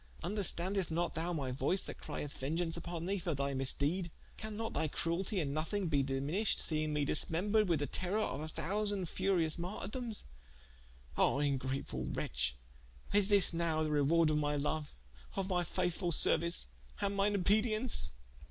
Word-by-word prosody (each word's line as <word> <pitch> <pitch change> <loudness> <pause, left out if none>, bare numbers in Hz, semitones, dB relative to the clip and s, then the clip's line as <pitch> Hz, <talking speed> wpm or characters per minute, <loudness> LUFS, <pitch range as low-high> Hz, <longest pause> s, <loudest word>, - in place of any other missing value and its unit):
Vnderstandest 190 -1 +1
not 170 +2 0
thou 165 +2 -2
my 140 -6 -2
voyce 165 +9 +2
that - - -7
crieth 145 -2 -5
vengeaunce 165 +5 -1
vpon 170 -1 -5
thee 200 +1 0
for 170 -3 -2
thy 140 0 -1
misdede? 145 +7 +1 0.3
Can 215 -1 -6
not 225 0 -3
thy 160 - +1
crueltie 175 +7 -1
in 140 -4 -1
nothing 170 +4 -1
be 145 -3 +3
diminished 140 +10 0
seing 155 -1 +1
me 150 -1 +1
dismembred 205 +9 +2
with 170 -3 +3
the - - +1
terrour 185 +8 0
of 140 - -2
a 155 - -4
thousand 200 +3 -1
furious 180 -5 +1
martirdomes? 210 +6 -4 0.9
Ah - - +3
ingrate 135 -1 0 0.3
wretche, - - -1 0.6
is 205 -1 +5
this 200 -4 +4
nowe 165 -2 +1
the 155 - -1
rewarde 155 +2 +4
of 150 - +2
my 145 0 0
loue, 150 +1 -1 0.5
of 195 -1 -1
my 180 -2 +1
faithfull 175 +1 -1
seruice, 170 +2 +3 0.3
and 200 -1 0
mine 200 +1 +2
obedience?" 215 - +2
170 Hz, 160 wpm, -34 LUFS, 150-195 Hz, 0.9 s, is